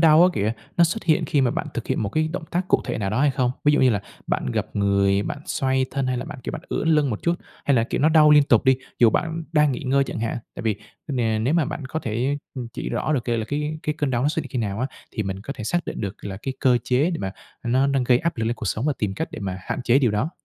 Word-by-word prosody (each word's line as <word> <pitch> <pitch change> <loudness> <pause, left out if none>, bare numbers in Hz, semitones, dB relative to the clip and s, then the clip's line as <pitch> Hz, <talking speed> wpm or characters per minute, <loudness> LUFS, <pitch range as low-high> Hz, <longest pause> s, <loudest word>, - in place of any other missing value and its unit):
đau 160 0 +7
á 180 - +7
kìa, 105 +2 +1 0.2
nó 170 - +6
xuất 170 +7 -2
hiện 160 -3 +3
khi 145 - +1
mà 130 -2 +3
bạn - - -3
thực - - -4
hiện - - 0
một 100 - -1
cái 155 +9 0
động 180 -3 -4
tác 180 +2 -1
cụ - - +4
thể - - -3
nào 100 -2 -1
đó 110 +5 0
hay 145 0 +4
không? 130 -2 +1
Ví 150 - +5
dụ 145 - +3
như 130 - +5
là 105 -3 0 0.3
bạn - - -1
gập - - -3
người, 100 0 +3
bạn 145 - -4
xoay 130 -1 +1
thân, 135 -1 -1
hay 130 - 0
là 130 - -4
bạn, 145 - -8
kiểu, - - -3
bạn - - -6
ưỡn 160 - -1
lưng 150 -4 +3
một 105 - -4
chút? 170 - +2 0.3
Hay 140 - +3
là 115 - +3
kiểu - - -2
nó 150 - +5
đau 155 -1 +6
liên 150 0 +8
tục 120 -6 +3
đi, 130 0 +5 0.2
dù 115 -2 +6
bạn 165 +4 -1
đang 150 -3 +4
nghỉ - - -4
ngơi 135 +1 +2
chẳng - - -5
hạn? 115 +1 -1 0.2
Tại - - -6
vì, 110 -2 +1 0.3
ờ, 145 - -3
nè 115 -4 +1
nếu 125 +8 +1
mà 170 -3 +3
bạn 140 - -5
có 155 - -2
thể, 125 +4 -1 0.2
ừm, 125 -4 -5
chỉ - - -4
rõ 155 - -1
được 125 -5 0
c - - -8
là 115 -2 0
cái 150 +2 -2
cái 150 - -1
cơn 145 -2 0
đau 120 -1 0
nó 140 - +3
xuất 155 +1 -1
hiện 135 - -10
khi 130 - -2
nào 105 -1 -2
á, 130 - +1 0.2
thì 110 - -2
mình 95 -1 -4
có 140 - -5
thể 130 -6 -7
xác 175 +8 0
định - - -4
được 100 -2 -5
là 95 -2 -5
cái 135 - -3
cơ 125 -2 +4
chế 135 +7 +2
để 165 - -2
mà, 95 -1 -3 0.3
ờ, 120 - -4
nó 130 +3 +3
đang 135 -2 +1
gây 125 0 +4
áp 170 +3 -2
lực 115 - -1
lên 115 +1 0
cột 110 -5 -4
sống 115 +6 -1
và 150 - +3
tìm 100 -3 -1
cách - - -3
để - - -7
mà 95 -2 -3
hạn 130 - -3
chế 125 +2 +4
điều 125 -5 +3
đó. 105 +10 0
130 Hz, 325 wpm, -23 LUFS, 110-150 Hz, 0.3 s, liên